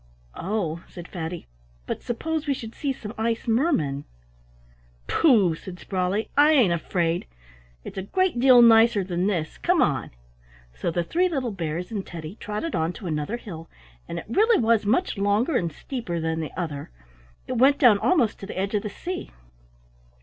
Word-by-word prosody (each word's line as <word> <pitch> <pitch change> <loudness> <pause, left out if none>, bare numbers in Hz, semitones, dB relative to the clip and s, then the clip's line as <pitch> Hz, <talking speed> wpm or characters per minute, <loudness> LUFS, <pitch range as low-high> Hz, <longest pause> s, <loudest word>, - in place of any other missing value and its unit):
"Oh," 180 -4 -3
said 175 -1 -10
Fatty, 170 -1 -6 0.4
"but - - -4
suppose 315 +6 -3
we 280 - +1
should 225 -2 -8
see 280 - -2
some 220 -4 -7
ice 230 +2 -1
mermen?" 195 - +1 1.0
"Pooh!" 220 - +4
said 180 +3 -9
Sprawley, 190 +3 -2
"I 295 +2 +6
ain't 235 - +4
afraid. 170 0 -1 0.6
It's - - -6
a 190 - -7
great 370 -9 +1
deal 250 -1 +7
nicer 225 -2 +6
than 180 0 -1
this. 170 -7 -2
Come - - +2
on." - - +1 0.6
So - - -3
the 175 +1 0
three 355 - +1
little 265 -8 -2
bears 175 0 -4
and 205 -3 -3
Teddy 165 -2 -8
trotted 210 +11 -4
on 160 +2 0
to 195 - -10
another 155 +6 -2
hill, 165 -8 -9 0.4
and - - -5
it - - -6
really 435 - +3
was 225 -3 +2
much 250 - +1
longer 205 +9 +1
and 170 -7 0
steeper 185 - -5
than 160 0 -1
the 155 - -3
other; 150 -5 -4 0.6
it 255 -2 -2
went 275 +3 +5
down 235 -7 +6
almost 265 - +2
to 195 - -8
the - - -7
edge 195 +2 -1
of 210 - +1
the 210 - -4
sea. 360 - -6
205 Hz, 175 wpm, -25 LUFS, 170-245 Hz, 1.0 s, deal